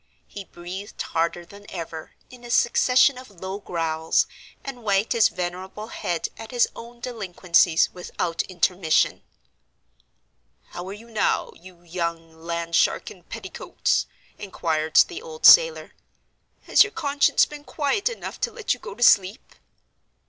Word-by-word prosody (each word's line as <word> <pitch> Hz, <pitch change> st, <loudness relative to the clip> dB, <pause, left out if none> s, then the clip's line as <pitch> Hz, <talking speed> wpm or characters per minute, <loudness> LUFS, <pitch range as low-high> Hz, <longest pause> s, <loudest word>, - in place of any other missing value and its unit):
He 200 Hz, -1 st, -9 dB
breathed 185 Hz, +4 st, -9 dB
harder 170 Hz, +1 st, -1 dB
than 200 Hz, +3 st, -15 dB
ever, 165 Hz, -3 st, -7 dB, 0.2 s
in 250 Hz, -1 st, -14 dB
a 240 Hz, -, -10 dB
succession 250 Hz, +2 st, +4 dB
of 255 Hz, -, -12 dB
low 190 Hz, +1 st, -7 dB
growls, 160 Hz, -4 st, 0 dB, 0.4 s
and 270 Hz, -3 st, -7 dB
wagged 200 Hz, -1 st, +1 dB
his 230 Hz, -2 st, +4 dB
venerable 185 Hz, +4 st, -6 dB
head 170 Hz, -2 st, -3 dB
at 225 Hz, -1 st, -9 dB
his 245 Hz, -1 st, +2 dB
own 235 Hz, +1 st, -11 dB
delinquencies 180 Hz, -8 st, +2 dB
without 175 Hz, -1 st, -3 dB
intermission. 175 Hz, -2 st, +1 dB, 1.5 s
"How 175 Hz, +1 st, -7 dB
are 195 Hz, -, -6 dB
you 230 Hz, +3 st, -13 dB
now, 220 Hz, -, 0 dB
you 175 Hz, -1 st, -16 dB
young 170 Hz, -1 st, -4 dB
land 170 Hz, +1 st, -4 dB
shark -, -, +2 dB
in -, -, -14 dB
petticoats?" -, -, -2 dB, 0.3 s
inquired 160 Hz, -5 st, -2 dB
the 360 Hz, +3 st, -8 dB
old 470 Hz, 0 st, -6 dB
sailor. -, -, +7 dB, 0.7 s
"Has -, -, +4 dB
your 410 Hz, -, -7 dB
conscience 285 Hz, -3 st, +3 dB
been 295 Hz, -1 st, -11 dB
quiet 305 Hz, -, -1 dB
enough 480 Hz, -, -8 dB
to 475 Hz, -, 0 dB
let 450 Hz, -1 st, -1 dB
you 250 Hz, -, -9 dB
go 195 Hz, -, -9 dB
to 240 Hz, -, -2 dB
sleep?" 195 Hz, -2 st, +3 dB
195 Hz, 140 wpm, -24 LUFS, 170-245 Hz, 1.5 s, sailor